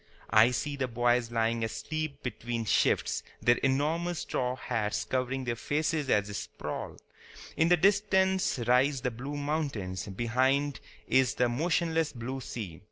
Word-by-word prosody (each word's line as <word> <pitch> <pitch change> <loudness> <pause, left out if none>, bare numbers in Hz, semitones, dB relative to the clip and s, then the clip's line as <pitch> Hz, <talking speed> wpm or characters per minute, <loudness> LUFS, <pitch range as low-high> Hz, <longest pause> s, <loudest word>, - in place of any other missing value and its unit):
I 110 +3 +7
see 140 +4 -2
the 130 -2 -1
boys 120 0 +1
lying 115 0 0
asleep 155 +5 -4
between 120 -1 -3
shifts, - - +2 0.2
their 120 0 +4
enormous 155 +6 0
straw 125 0 -1
hats 110 -4 -2
covering 130 +1 -1
their 120 -2 -2
faces 150 +3 -1
as 105 -4 +3
they 105 - -7
sprawl. - - -5 0.6
In 165 - +3
the 175 - +6
distance 190 -1 +3
rise 130 +3 +3
the 125 - -1
blue 135 +5 -6
mountains; 140 - -2
behind 130 +7 +1 0.3
is 130 -2 +3
the 125 - +2
motionless 165 +4 0
blue 130 +2 -5
sea. 100 -10 -6
130 Hz, 145 wpm, -29 LUFS, 120-150 Hz, 0.6 s, I